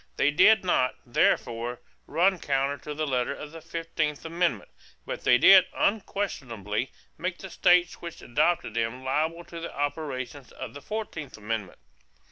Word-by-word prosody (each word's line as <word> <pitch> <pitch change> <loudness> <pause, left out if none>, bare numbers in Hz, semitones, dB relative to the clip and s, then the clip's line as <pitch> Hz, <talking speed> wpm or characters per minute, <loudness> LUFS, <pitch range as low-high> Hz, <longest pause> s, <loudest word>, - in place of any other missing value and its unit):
They 145 - +3
did 195 +6 +5
not, 130 -8 +2
therefore, 120 0 +1 0.3
run 185 +2 +2
counter 140 0 0
to 150 - -7
the 155 +1 -1
letter 130 -1 0
of 150 - -9
the 165 0 -10
fifteenth 165 -2 -3
amendment; 170 +1 -1 0.3
but - - -5
they - - +6
did 190 +7 +8
unquestionably 130 - -1 0.3
make 180 0 -2
the 190 - -9
states 175 -1 +3
which 170 -1 -8
adopted 150 0 +1
them 115 +3 -2
liable 160 +6 -1
to 170 0 -9
the 170 - -7
operations 140 -3 -4
of 130 -3 -7
the 145 - -9
fourteenth 160 - -5
amendment. 105 -3 -4
150 Hz, 150 wpm, -27 LUFS, 125-175 Hz, 0.3 s, did